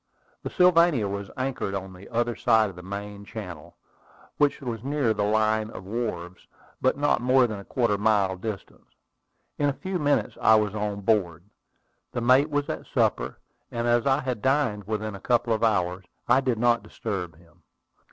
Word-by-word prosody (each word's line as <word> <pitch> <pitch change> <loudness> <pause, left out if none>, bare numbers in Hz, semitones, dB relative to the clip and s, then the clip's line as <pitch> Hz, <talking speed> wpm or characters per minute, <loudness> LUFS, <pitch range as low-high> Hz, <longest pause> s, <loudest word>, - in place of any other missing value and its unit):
The - - -5
Sylvania 170 - +4
was 100 0 -5
anchored 130 -6 -2
on 95 -1 -5
the 90 +2 -13
other 120 0 0
side 110 -3 +3
of - - -17
the 90 - -9
main 100 +2 -7
channel, 90 -8 -9 0.6
which 145 -1 +2
was 120 -4 -5
near 140 -4 +1
the 105 - -3
line 110 +1 +1
of 95 - -9
wharves, 95 -5 -5 0.3
but 130 +1 +2
not 145 -3 +2
more 130 +1 +4
than 110 -4 -4
a - - -9
quarter 120 0 0
of 100 - -1
a - - -6
mile 100 -4 +3
distant. 100 +1 -7 0.7
In 145 -1 +3
a - - -1
few 185 +5 -4
minutes 145 -2 0
I 110 - +6
was 105 -2 +1
on 105 -1 -3
board. 95 -6 +1 0.7
The 120 - -2
mate 130 +5 +4
was 145 -1 -1
at - - -5
supper; 60 +2 0 0.3
and 115 0 -3
as 120 +2 +2
I 135 +2 +3
had 125 -5 -3
dined 130 -7 +1
within 110 0 -3
a 100 - -8
couple 120 0 +1
of 110 - -1
hours, 95 -4 +1 0.2
I 135 - +5
did 130 -4 0
not 120 0 +3
disturb 90 -7 -5
him. 85 0 -23
110 Hz, 190 wpm, -26 LUFS, 100-130 Hz, 0.7 s, I